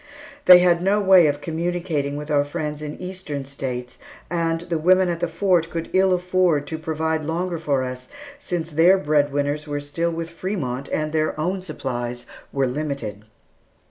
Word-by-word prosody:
They 180 -1 +11
had 175 -1 +3
no 195 +3 +2
way 190 -4 +6
of 145 0 -1
communicating 165 -3 -2
with 150 +1 -5
our 145 -1 +4
friends 150 +1 -4
in 150 -1 -6
Eastern 180 -7 -5
States, 130 -2 -5 0.3
and 165 -1 0
the 170 -2 -2
women 185 +3 +4
at 170 -1 -2
the 175 - 0
Fort 170 0 +1
could 165 -1 -5
ill 190 0 +4
afford 180 -4 +2
to 160 +2 -5
provide 160 0 -1
longer 170 +2 -2
for 140 -4 0
us, 125 0 -6 0.3
since 170 - -4
their 170 +5 +5
bread 150 -4 +1
winners 145 +2 -1
were 145 0 -2
still 145 +4 -2
with 165 0 -5
Frémont, 150 -8 -4
and 155 0 -1
their 155 -1 0
own 185 +4 -1
supplies 125 -7 -5 0.3
were 135 -1 +1
limited. 125 -6 -4
160 Hz, 175 wpm, -22 LUFS, 145-175 Hz, 0.3 s, They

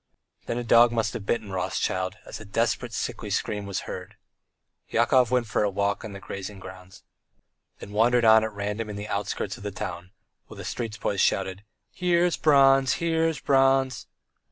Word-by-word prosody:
Then 115 - -2
a 120 - -2
dog 120 0 +6
must 110 -2 -1
have 100 - -7
bitten 110 -4 -1
Rothschild, 95 0 -2
as - - -8
a - - -9
desperate, 115 +3 -1
sickly - - -4
scream 105 -1 -2
was 100 -1 -3
heard. - - -8 0.7
Yakov 120 +1 +3
went 125 -1 +1
for 110 - -1
a 105 - +2
walk 100 +1 -1
on 110 - -7
the 100 - -8
grazing 100 +1 -7
ground, 95 -1 -12 0.7
then 100 - -10
wandered 115 +3 +3
on 110 0 +7
at 110 - -2
random 105 +2 -4
in 105 - -5
the 105 +1 -6
outskirts 100 +1 -3
of 115 - -12
the 105 - -3
town, 90 -2 -6 0.4
while - - -12
the - - -8
street 115 -2 -4
boys 100 - -1
shouted: 95 0 0 0.3
"Here's 175 -1 +2
Bronze! 135 -3 +5
Here's 165 -2 0
Bronze!" 135 -2 +2
110 Hz, 180 wpm, -26 LUFS, 100-125 Hz, 0.7 s, on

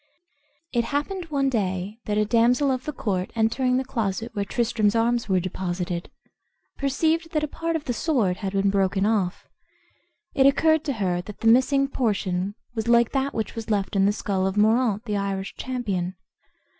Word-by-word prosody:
It 235 -2 +1
happened 295 +8 -2
one 280 -4 0
day 200 -3 -2
that 210 0 -1
a 210 - +3
damsel 245 +5 +3
of 255 -1 -2
the 300 - -2
court, 190 -9 -2
entering 250 +3 +2
the 260 - -1
closet 225 -3 -2
where 200 - -1
Tristram's 220 -1 +1
arms 230 0 +1
were 190 -1 +3
deposited, 180 -1 -3 0.7
perceived 320 +4 0
that 305 -1 +1
a - - 0
part 330 +3 -3
of 320 - -2
the 250 - -2
sword 230 - +1
had 195 -1 -4
been 195 0 +2
broken 195 0 +1
off. 205 -4 0 0.9
It 270 0 +5
occurred 315 +3 +3
to 285 - 0
her 185 -6 -1
that 205 +2 -11
the 225 - +1
missing 260 +4 +4
portion 200 -7 -1 0.2
was 220 -1 -3
like 235 -1 +4
that 275 0 -1
which 220 - -2
was 225 -1 -6
left 205 -2 0
in 195 0 +4
the - - +4
skull 195 -2 -1
of 190 +1 -3
Moraunt, 220 0 +3
the 210 -3 -1
Irish 195 -1 -3
champion. 200 -8 -3
225 Hz, 180 wpm, -24 LUFS, 195-260 Hz, 0.9 s, It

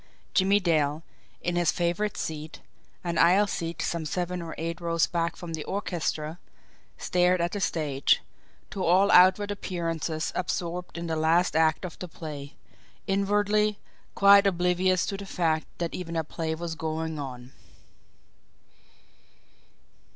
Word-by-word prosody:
Jimmie 195 +2 +4
Dale, 155 -4 +1 0.4
in 175 0 -1
his 175 -2 +3
favourite 175 +5 -1
seat, 155 0 -5 0.4
an 170 -2 -1
aisle 185 +5 +5
seat 170 -4 -4
some 170 -1 -2
seven 180 +2 -2
or 165 -1 -7
eight 165 +1 -4
rows 170 -1 +2
back 170 -1 -1
from 170 -2 -8
the 155 -2 -3
orchestra, 175 -4 -3 0.6
stared 180 0 +2
at 170 +1 0
the 205 - -3
stage, 150 -7 +1 0.5
to 190 - -3
all 185 +4 +4
outward 190 +3 +6
appearances 165 -5 -3
absorbed 180 0 -3
in 170 - -4
the 165 -1 -2
last 160 +2 +2
act 160 +2 +2
of 175 - -8
the 180 - -5
play; 150 -3 -8 0.5
inwardly, 205 +1 +1 0.4
quite 200 0 +7
oblivious 180 0 +2
to 195 - -3
the 200 - -7
fact 160 -4 0
that 170 -1 -3
even 170 -2 -5
a 160 - 0
play 160 +1 -3
was 170 0 -4
going 160 -1 -3
on. 125 -2 -7
170 Hz, 140 wpm, -27 LUFS, 160-185 Hz, 0.6 s, quite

